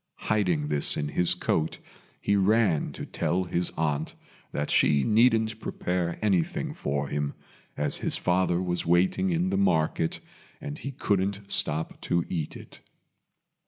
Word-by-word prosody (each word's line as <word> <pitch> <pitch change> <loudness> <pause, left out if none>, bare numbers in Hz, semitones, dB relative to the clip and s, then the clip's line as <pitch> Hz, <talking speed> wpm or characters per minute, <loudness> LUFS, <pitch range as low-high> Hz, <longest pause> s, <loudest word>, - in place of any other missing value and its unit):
Hiding 90 -9 +1
this 75 -1 +2
in 75 0 -2
his 90 +3 +2
coat, 80 -2 -1 0.4
he 100 - +1
ran 100 -4 +2
to - - -6
tell 85 +3 -1
his 90 0 -1
aunt 75 -1 -1 0.4
that 75 0 -2
she 70 -2 +4
needn't 110 -1 +3
prepare 90 -4 -2
anything 95 -6 0
for 70 0 -2
him, 75 0 -2 0.4
as - - 0
his - - 0
father 90 -1 +1
was 90 -1 -1
waiting 90 - +2
in 175 +2 +1
the 195 - +1
market, 80 - +1 0.4
and 70 0 -6
he 140 - -5
couldn't 100 -6 0
stop 80 +2 -1
to 85 -1 0
eat 80 -4 -3
it. - - -11
90 Hz, 145 wpm, -27 LUFS, 75-105 Hz, 0.4 s, she